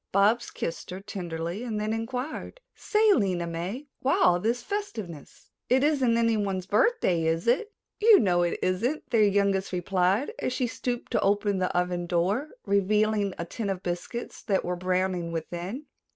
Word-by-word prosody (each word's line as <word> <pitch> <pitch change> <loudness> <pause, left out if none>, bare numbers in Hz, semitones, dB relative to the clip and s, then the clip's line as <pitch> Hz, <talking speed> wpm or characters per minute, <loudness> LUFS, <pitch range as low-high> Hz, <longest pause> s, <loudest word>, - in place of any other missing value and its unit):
Bobs 210 +5 +3
kissed 165 - -5
her 180 +1 -5
tenderly 175 0 -5
and 220 -4 -3
then 215 +1 -1
inquired: 250 - -4
"Say, 430 -1 +3
Lena 185 - +1
May, 175 - -4
why 270 - +1
all 175 0 +5
this 235 +5 -1
festiveness? 220 - -6 0.2
It 260 +2 +4
isn't 270 -6 +3
anyone's 205 -5 +1
birthday, 200 - +2
is 165 +1 0
it?" 270 - +2 0.3
"You 435 -1 +8
know 180 -4 +2
it 175 -1 0
isn't," 230 +12 0
their 230 -3 +4
youngest 200 -1 +2
replied 185 - +1
as 255 - -1
she 255 - 0
stopped 245 +1 -4
to - - +1
open 205 0 +1
the 185 - 0
oven 180 -1 -1
door, 190 - 0 0.2
revealing 205 0 +2
a 170 - -3
tin 205 +4 -4
of 190 -1 -3
biscuits 180 +7 -5
that 195 -3 0
were 180 - -1
browning 185 -1 -1
within. 175 - -5
200 Hz, 165 wpm, -27 LUFS, 180-240 Hz, 0.3 s, You